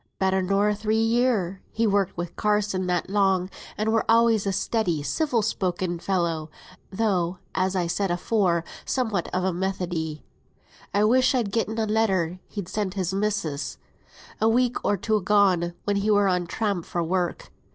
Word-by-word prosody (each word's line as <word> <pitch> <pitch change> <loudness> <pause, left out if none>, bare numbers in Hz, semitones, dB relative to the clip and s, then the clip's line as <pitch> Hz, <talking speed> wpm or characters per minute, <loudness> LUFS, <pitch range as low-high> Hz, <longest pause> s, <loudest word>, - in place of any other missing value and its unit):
"Better 190 0 +1
nor 200 +3 +2
three 215 +1 -1
year. 225 -6 +1
He's 225 0 +1
worked 200 -3 +1
wi' 175 - -1
Carsons 210 -3 0
that 180 -1 0
long, 190 -2 +1 0.3
and 220 +1 0
were 225 - +3
alway 230 0 +5
a 200 -2 0
steady, 185 -6 0
civil 240 - 0
spoken 180 -4 -1
fellow, 170 -4 -1 0.4
though, 190 -4 0 0.2
as 190 0 0
I 180 -2 +1
said 195 +3 -1
afore, 175 -1 +1 0.2
somewhat 220 -9 -1
of 185 - -1
a 190 -1 +1
Methodee. 175 -4 -3 0.7
I 205 - +2
wish 255 +4 +4
I'd 230 -6 0
gotten 225 0 -1
a 225 - +1
letter 190 -5 +1
he 200 -3 -5
sent 200 +1 -3
his 190 -2 -1
missis, 195 -8 -2 0.6
a 220 - +4
week 245 +1 +2
or 205 - +1
two 215 +3 +1
agone, 185 -4 +2
when 205 -1 0
he 200 +2 0
were 205 -1 +4
on 180 -2 0
tramp 200 -3 -2
for 175 - -2
work. 175 +1 -2
195 Hz, 165 wpm, -25 LUFS, 180-215 Hz, 0.7 s, alway